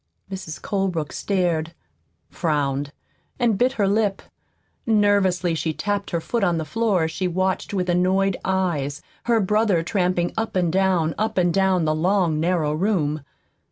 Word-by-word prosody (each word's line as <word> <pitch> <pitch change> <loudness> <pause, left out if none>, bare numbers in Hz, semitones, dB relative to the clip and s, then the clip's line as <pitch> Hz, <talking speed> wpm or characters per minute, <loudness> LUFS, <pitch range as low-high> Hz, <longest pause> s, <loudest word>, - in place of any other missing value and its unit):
Mrs. 185 -5 -6
Colebrook 185 -6 -2
stared, 170 -4 -1 0.6
frowned, 145 -3 -1 0.5
and 240 -4 +2
bit 250 +6 +2
her 205 -6 +1
lip. 200 -1 +1 0.6
Nervously 200 -5 +3
she 160 0 -1
tapped 205 +3 -2
her 170 - -1
foot 230 +6 -2
on 175 -3 +2
the 160 - -2
floor 215 -3 +1
as 160 - -1
she 185 +2 -2
watched 185 +2 -1
with 185 -3 -1
annoyed 185 +2 +2
eyes 170 -7 -1 0.2
her 235 -1 +3
brother 210 -3 +2
tramping 180 -2 0
up 225 -2 -3
and 175 -3 +1
down, 185 -4 +2
up 220 0 -1
and 175 -2 +3
down, 190 -3 +2
the 155 - +2
long, 170 -1 +1
narrow 165 -3 +1
room. 155 -4 0
185 Hz, 155 wpm, -23 LUFS, 165-200 Hz, 0.6 s, Nervously